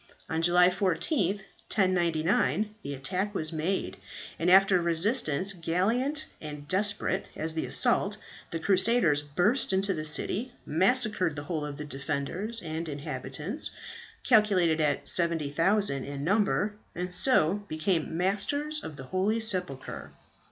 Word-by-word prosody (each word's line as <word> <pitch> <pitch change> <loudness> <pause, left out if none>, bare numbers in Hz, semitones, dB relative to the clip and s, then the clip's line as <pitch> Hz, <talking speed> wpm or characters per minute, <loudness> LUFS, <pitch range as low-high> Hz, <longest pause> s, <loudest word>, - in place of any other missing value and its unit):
On 160 0 -2
July 175 +1 +5
14th, 190 - 0 0.3
1099, 180 - +1
the 140 -4 -6
attack 185 +9 -2
was 155 -2 -1
made, 165 +5 -2 0.4
and 170 - +1
after 190 -1 +5
resistance 175 - +2
gallant 225 - -1 0.2
and 150 -1 -8
desperate 200 +1 0
as 160 +1 -2
the 160 - -3
assault, - - +2 0.3
the 165 - -3
crusaders 185 -3 +2
burst 180 - 0
into 195 +1 +1
the 155 -3 -4
city, 210 +10 +1
massacred 190 -1 +2
the 145 - -5
whole 155 0 -3
of 145 -1 -6
the 150 - -6
defenders 150 - -4
and 160 0 -5
inhabitants, 145 - -4 0.5
calculated 190 -9 +3
at 150 -2 0
70,000 165 0 +2
in 140 0 -6
number, 205 +3 +1 0.2
and 180 +1 -3
so 200 -2 +4
became 160 0 -2
masters 285 - -1
of 155 - -7
the 135 - -9
holy 190 - -1
sepulchre. 180 - -1
180 Hz, 130 wpm, -28 LUFS, 155-205 Hz, 0.5 s, July